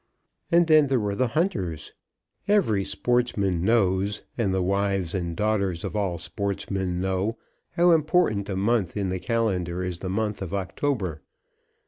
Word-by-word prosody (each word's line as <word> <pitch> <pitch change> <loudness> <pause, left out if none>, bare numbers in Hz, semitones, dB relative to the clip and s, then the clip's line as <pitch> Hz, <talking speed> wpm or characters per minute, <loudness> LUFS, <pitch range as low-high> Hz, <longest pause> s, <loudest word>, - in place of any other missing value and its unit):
And 170 0 +5
then 155 -3 +5
there 130 -2 +2
were 105 -2 -1
the 130 +5 +1
hunters. 120 - -2 0.5
Every 160 - +3
sportsman 100 -8 0
knows, 100 -2 +1
and 110 -5 0
the 95 -1 +1
wives 100 -2 0
and 85 -3 -2
daughters 100 -5 0
of - - -4
all 95 -4 -1
sportsmen 95 +1 -3
know, 95 +4 -1 0.4
how 175 0 +4
important 155 - +2
a 95 - -2
month 100 -1 0
in 100 -2 -1
the 95 0 -2
calendar 90 -4 -1
is 90 -2 -4
the 95 - -4
month 105 +1 -2
of 95 0 -3
October. 95 - -2
100 Hz, 150 wpm, -25 LUFS, 95-115 Hz, 0.5 s, And